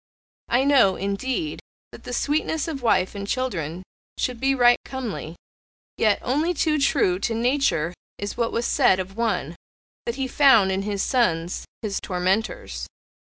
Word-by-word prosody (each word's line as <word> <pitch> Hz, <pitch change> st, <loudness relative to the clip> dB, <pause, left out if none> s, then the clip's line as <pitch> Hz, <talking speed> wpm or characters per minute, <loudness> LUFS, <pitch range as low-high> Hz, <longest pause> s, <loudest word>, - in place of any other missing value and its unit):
I 245 Hz, +2 st, +3 dB
know, 270 Hz, -9 st, +5 dB
indeed, 255 Hz, -, -2 dB, 0.3 s
that -, -, -13 dB
the -, -, -6 dB
sweetness 300 Hz, +4 st, 0 dB
of 295 Hz, -5 st, -4 dB
wife 190 Hz, -6 st, +2 dB
and 200 Hz, -1 st, -6 dB
children 185 Hz, -, -2 dB, 0.3 s
should 250 Hz, -2 st, -2 dB
be 270 Hz, +2 st, +2 dB
right 245 Hz, -1 st, +5 dB
comely, 230 Hz, -11 st, -5 dB, 0.6 s
yet 215 Hz, -2 st, +3 dB
only 310 Hz, +7 st, 0 dB
too 305 Hz, 0 st, +1 dB
true 185 Hz, -9 st, +2 dB
to 225 Hz, +3 st, -1 dB
nature 235 Hz, -, +1 dB, 0.2 s
is 205 Hz, 0 st, -5 dB
what 235 Hz, -1 st, 0 dB
was 235 Hz, -, -1 dB
said 245 Hz, -9 st, +3 dB
of 190 Hz, +1 st, -5 dB
one 190 Hz, -9 st, -1 dB, 0.5 s
that 235 Hz, -, -1 dB
he 265 Hz, -1 st, -2 dB
found 255 Hz, -8 st, +5 dB
in 190 Hz, +1 st, 0 dB
his 200 Hz, -1 st, -2 dB
sons 180 Hz, -10 st, 0 dB, 0.2 s
his 205 Hz, -3 st, -2 dB
tormentors. 190 Hz, -, -2 dB
230 Hz, 155 wpm, -24 LUFS, 190-265 Hz, 0.6 s, know